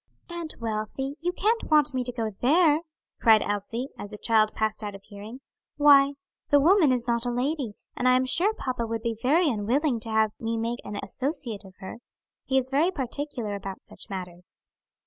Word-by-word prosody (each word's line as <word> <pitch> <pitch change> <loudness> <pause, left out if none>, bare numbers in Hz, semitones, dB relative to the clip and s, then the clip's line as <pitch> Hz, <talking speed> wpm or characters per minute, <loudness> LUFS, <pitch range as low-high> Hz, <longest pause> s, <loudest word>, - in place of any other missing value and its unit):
"Aunt 340 -2 -3
Wealthy, 230 +5 -3
you 355 +1 0
can't 440 +5 0
want 300 -2 +4
me 255 -1 -1
to 245 - -1
go 225 -3 -3
there!" 305 +3 +4 0.4
cried 220 -3 +5
Elsie, 225 +6 -3
as 205 - -6
the 210 - -8
child 215 -1 +2
passed 220 0 -1
out 205 -1 -5
of 195 - -12
hearing. 215 +6 -10 0.4
"Why, 285 -1 +6 0.4
the 290 - +6
woman 330 -1 +5
is 245 -2 0
not 235 0 +1
a - - 0
lady, 255 -1 -2 0.2
and 250 - 0
I 255 - +6
am 255 0 +2
sure 350 +11 +3
papa 250 - -3
would 225 0 -4
be 230 -1 -1
very 315 +7 +3
unwilling 245 +3 0
to 225 0 -7
have 220 -1 +2
me 230 0 -2
make 230 +2 -2
an 205 0 -6
associate 250 - -3
of 190 -1 -14
her. 190 - -7 0.5
He 265 - +1
is 260 0 0
very 300 +6 +3
particular 265 - -4
about 195 -1 -7
such - - -9
matters." 180 -2 -7
245 Hz, 195 wpm, -26 LUFS, 215-285 Hz, 0.5 s, Why